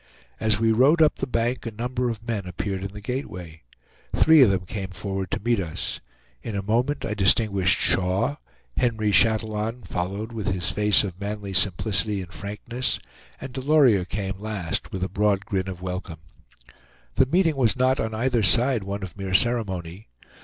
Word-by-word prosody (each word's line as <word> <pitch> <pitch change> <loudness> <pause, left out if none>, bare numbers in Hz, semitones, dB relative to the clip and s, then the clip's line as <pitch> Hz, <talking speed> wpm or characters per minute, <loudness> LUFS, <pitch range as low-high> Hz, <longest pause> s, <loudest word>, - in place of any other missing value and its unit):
As 110 -2 +2
we 115 0 +3
rode 135 +9 +4
up 155 -2 +4
the 135 - -3
bank, 120 0 -1
a - - -3
number 125 +3 -2
of 115 0 -6
men 105 -5 -2
appeared 95 +2 -4
in 100 - -5
the 105 +1 -10
gateway. 90 - -6 0.5
Three 160 -2 +6
of 125 - +7
them 95 -1 -1
came 95 0 -5
forward 95 0 -4
to - - -2
meet 115 +1 +1
us. 85 -4 -4 0.4
In 110 - -5
a 100 - -2
moment 120 +8 0
I 105 - -2
distinguished 100 -2 +3
Shaw; 95 +10 +1 0.4
Henry 110 -4 +1
Chatillon 110 +3 +2
followed 100 +6 -4
with 110 -3 -5
his 90 -2 -1
face 105 0 +4
of 95 -1 -6
manly 100 -1 -4
simplicity 100 +2 +1
and 90 +1 -13
frankness, 110 +5 -3 0.4
and 130 - -8
Delorier 130 -7 +4
came 95 -1 -4
last, 100 -6 -3
with 95 -1 -4
a - - +1
broad 100 -1 0
grin 95 -1 -2
of 90 -1 -7
welcome. 90 -4 -5 0.9
The 130 - +3
meeting 165 +1 +2
was 125 -4 +2
not 130 +1 +2
on 110 0 -2
either 120 +1 +1
side 120 +3 +3
one 100 +1 -5
of 95 - -7
mere 95 -1 -2
ceremony. 95 -6 0
105 Hz, 175 wpm, -24 LUFS, 95-120 Hz, 0.9 s, of